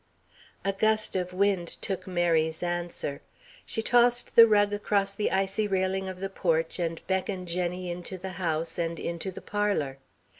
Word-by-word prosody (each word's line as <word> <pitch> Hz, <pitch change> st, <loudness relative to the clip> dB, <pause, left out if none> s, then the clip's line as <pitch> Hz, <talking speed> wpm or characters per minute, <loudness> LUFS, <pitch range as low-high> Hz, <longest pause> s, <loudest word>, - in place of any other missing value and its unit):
A 195 Hz, -, +1 dB
gust 215 Hz, +1 st, +1 dB
of 180 Hz, -1 st, -1 dB
wind 190 Hz, -2 st, +1 dB
took 195 Hz, -1 st, -4 dB
Mary's 165 Hz, -3 st, +1 dB
answer. 175 Hz, -4 st, -3 dB, 0.5 s
She 225 Hz, -, -2 dB
tossed 240 Hz, +1 st, +3 dB
the 230 Hz, 0 st, +10 dB
rug 205 Hz, -1 st, +3 dB
across 200 Hz, -1 st, +1 dB
the 210 Hz, -, 0 dB
icy 195 Hz, +2 st, 0 dB
railing 190 Hz, 0 st, 0 dB
of 185 Hz, -1 st, -7 dB
the 195 Hz, -, -2 dB
porch 165 Hz, -3 st, 0 dB
and 165 Hz, -1 st, -2 dB
beckoned 190 Hz, -1 st, -2 dB
Jenny 180 Hz, +1 st, -1 dB
into 180 Hz, +2 st, -5 dB
the 190 Hz, +1 st, -6 dB
house, 165 Hz, -1 st, -1 dB
and 165 Hz, -1 st, -2 dB
into 170 Hz, +3 st, -3 dB
the 185 Hz, -, -8 dB
parlour. 200 Hz, -10 st, -1 dB
185 Hz, 160 wpm, -28 LUFS, 175-200 Hz, 0.5 s, the